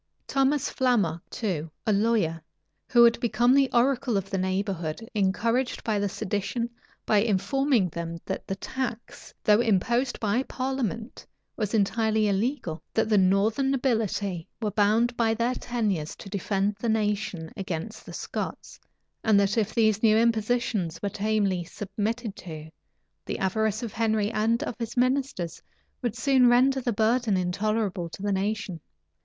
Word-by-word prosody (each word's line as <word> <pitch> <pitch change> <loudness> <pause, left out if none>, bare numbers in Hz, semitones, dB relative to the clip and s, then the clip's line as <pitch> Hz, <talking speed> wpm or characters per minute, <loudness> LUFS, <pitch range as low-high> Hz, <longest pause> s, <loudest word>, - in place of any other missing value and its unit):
Thomas 275 +1 +1
Flammoc, 245 -10 +1
too, 170 -8 -3 0.2
a 215 - +3
lawyer, 200 -6 +1 0.5
who 240 -1 +6
had 235 -1 +5
become 240 +1 +3
the 275 -1 +4
oracle 245 -2 +2
of 195 0 -4
the 195 - 0
neighborhood, 190 0 -2
encouraged 230 +5 0
the 205 -2 0
sedition, 205 +6 -2 0.3
by 210 - +4
informing 225 +3 +2
them 170 0 -5
that 190 - -4
the 195 - -2
tax, 240 +3 -5
though 210 +2 +5
imposed 240 +4 +1
by 220 +3 +1
parliament, 255 -4 -4 0.3
was 215 -1 -1
entirely 220 +1 +2
illegal; 200 - -1
that 220 -1 +2
the 215 - +4
northern 205 +8 +2
nobility 220 -9 -1
were 215 -3 -1
bound 220 +4 +2
by 225 -1 +2
their 235 +2 0
tenures 210 -12 -2
to 195 - -10
defend 200 +1 -1
the 235 - -1
nation 210 -6 -1
against 190 +1 -5
the - - -10
Scots; - - -5 0.4
and 215 -2 +5
that 200 0 +2
if 220 -2 +1
these 215 -2 +3
new 220 -1 +5
impositions 225 -6 +1
were 200 - 0
tamely 200 -3 0
submitted 205 +4 -4
to, 155 -2 -9 0.6
the - - -2
avarice 220 +3 0
of 230 - -5
Henry 220 -2 +1
and 230 +4 +1
of 300 - -3
his 230 +1 -5
ministers 255 - 0 0.4
would 240 -4 -2
soon 255 +1 +4
render 260 +2 +4
the 245 - 0
burden 220 -1 +2
intolerable 195 0 -1
to 190 - -9
the 205 - 0
nation. 200 -2 -2
215 Hz, 150 wpm, -26 LUFS, 195-235 Hz, 0.6 s, who